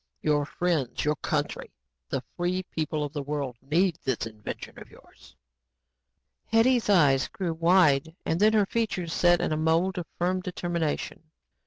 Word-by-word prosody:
Your 145 Hz, -1 st, +1 dB
friends, 160 Hz, -10 st, -1 dB
your 150 Hz, 0 st, +2 dB
country, -, -, -2 dB, 0.4 s
the -, -, -2 dB
free 180 Hz, +1 st, -1 dB
people 155 Hz, -3 st, -3 dB
of 145 Hz, 0 st, -5 dB
the 145 Hz, -, -3 dB
world, 140 Hz, -4 st, -4 dB
need 165 Hz, +6 st, +1 dB
this 130 Hz, -4 st, -1 dB
invention 105 Hz, -2 st, -8 dB
of -, -, -12 dB
yours." -, -, -19 dB, 1.1 s
Hetty's 230 Hz, +1 st, +3 dB
eyes 145 Hz, -9 st, +4 dB
grew 180 Hz, -4 st, -3 dB
wide 160 Hz, -3 st, +3 dB
and 160 Hz, -, 0 dB
then 215 Hz, +2 st, +5 dB
her 210 Hz, -2 st, +4 dB
features 195 Hz, -6 st, -2 dB
set 175 Hz, 0 st, +4 dB
in -, -, -1 dB
a 155 Hz, -, 0 dB
mold 165 Hz, +4 st, +1 dB
of 170 Hz, -, -6 dB
firm 185 Hz, +1 st, 0 dB
determination. 170 Hz, -4 st, -3 dB
165 Hz, 155 wpm, -27 LUFS, 150-185 Hz, 1.1 s, then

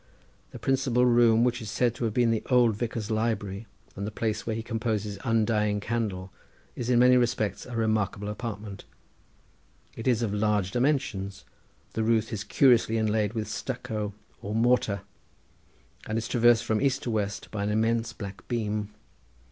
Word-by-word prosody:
The -, -, -9 dB
principal 130 Hz, -2 st, +2 dB
room, 120 Hz, -2 st, +5 dB
which 125 Hz, 0 st, +1 dB
is 110 Hz, -, -6 dB
said 120 Hz, -2 st, +1 dB
to 120 Hz, -, -3 dB
have 110 Hz, -, -1 dB
been 120 Hz, -2 st, +3 dB
the 115 Hz, -, 0 dB
old 120 Hz, -4 st, +4 dB
vicar's 115 Hz, -1 st, -3 dB
library, 110 Hz, -2 st, -2 dB, 0.3 s
and 100 Hz, +1 st, -4 dB
the -, -, -2 dB
place 110 Hz, +1 st, -3 dB
where 110 Hz, -, -1 dB
he 115 Hz, -, -4 dB
composed 115 Hz, -3 st, -1 dB
his 100 Hz, -2 st, -6 dB
undying 110 Hz, -2 st, +1 dB
Candle, 100 Hz, -4 st, -3 dB, 0.4 s
is 120 Hz, 0 st, -4 dB
in 125 Hz, -, +4 dB
many 125 Hz, +1 st, +6 dB
respects 120 Hz, -3 st, 0 dB
a 125 Hz, -, -7 dB
remarkable 110 Hz, -2 st, 0 dB
apartment. 105 Hz, -2 st, -6 dB, 1.1 s
It 115 Hz, -, -5 dB
is 120 Hz, -2 st, +2 dB
of 105 Hz, -3 st, -1 dB
large 105 Hz, -2 st, +1 dB
dimensions. 120 Hz, -7 st, -1 dB, 0.5 s
The 110 Hz, -, -1 dB
roof 110 Hz, 0 st, +1 dB
is 105 Hz, -1 st, -3 dB
curiously 120 Hz, -4 st, +4 dB
inlaid 110 Hz, -1 st, +1 dB
with 110 Hz, -3 st, -3 dB
stucco 110 Hz, -3 st, -4 dB, 0.3 s
or 105 Hz, +2 st, -4 dB
mortar, 115 Hz, -4 st, +2 dB, 1.1 s
and 110 Hz, -, -1 dB
is 115 Hz, 0 st, -2 dB
traversed 120 Hz, -1 st, +4 dB
from 110 Hz, -1 st, 0 dB
east 140 Hz, -2 st, +1 dB
to 120 Hz, -, -2 dB
west 105 Hz, -1 st, -3 dB
by 105 Hz, -, -3 dB
an 100 Hz, -, 0 dB
immense 115 Hz, +2 st, +1 dB
black 100 Hz, -3 st, -9 dB
beam. 105 Hz, -3 st, -2 dB
110 Hz, 170 wpm, -27 LUFS, 105-120 Hz, 1.1 s, many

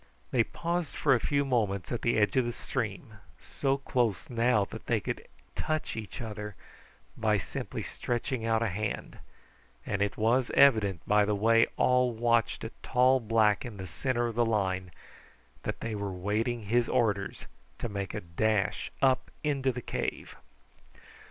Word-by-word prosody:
They 120 Hz, -, +4 dB
paused 170 Hz, +4 st, -3 dB
for 140 Hz, -, +3 dB
a 125 Hz, -, +3 dB
few 140 Hz, +2 st, +1 dB
moments 105 Hz, -8 st, 0 dB
at 120 Hz, -, -2 dB
the 120 Hz, -, +2 dB
edge 105 Hz, -2 st, +2 dB
of 130 Hz, -, +4 dB
the 120 Hz, -, -2 dB
stream, -, -, -4 dB, 0.2 s
so 135 Hz, -1 st, -1 dB
close 120 Hz, -7 st, -1 dB
now 115 Hz, -3 st, +3 dB
that -, -, -10 dB
they -, -, +2 dB
could -, -, -5 dB, 0.3 s
touch 155 Hz, 0 st, -2 dB
each 110 Hz, 0 st, -6 dB
other 105 Hz, -2 st, -6 dB, 0.6 s
by 110 Hz, -2 st, +2 dB
simply 90 Hz, -, -5 dB
stretching 120 Hz, 0 st, -3 dB
out 115 Hz, 0 st, +2 dB
a 115 Hz, -, +1 dB
hand; 105 Hz, +3 st, -4 dB, 0.7 s
and 100 Hz, -1 st, -2 dB
it 100 Hz, 0 st, 0 dB
was 120 Hz, +3 st, +2 dB
evident 105 Hz, -10 st, +4 dB
by 105 Hz, 0 st, +5 dB
the 105 Hz, 0 st, +1 dB
way 115 Hz, +3 st, +4 dB
all 125 Hz, -1 st, +3 dB
watched 115 Hz, 0 st, +1 dB
a -, -, -5 dB
tall 130 Hz, +1 st, +4 dB
black 110 Hz, -2 st, +3 dB
in 120 Hz, -5 st, -7 dB
the 95 Hz, -, -6 dB
centre 120 Hz, -, -1 dB
of 120 Hz, -, -2 dB
the 120 Hz, +2 st, +2 dB
line 95 Hz, -5 st, 0 dB, 0.7 s
that -, -, -4 dB
they 115 Hz, -, -3 dB
were 100 Hz, -1 st, -3 dB
waiting 105 Hz, +5 st, -1 dB
his 120 Hz, +4 st, +1 dB
orders 105 Hz, -6 st, 0 dB, 0.3 s
to -, -, -3 dB
make 100 Hz, -3 st, -4 dB
a -, -, -3 dB
dash 100 Hz, +4 st, 0 dB
up 130 Hz, -1 st, +3 dB
into 140 Hz, -3 st, +1 dB
the 125 Hz, -1 st, -6 dB
cave. -, -, -4 dB
115 Hz, 165 wpm, -30 LUFS, 105-125 Hz, 0.7 s, by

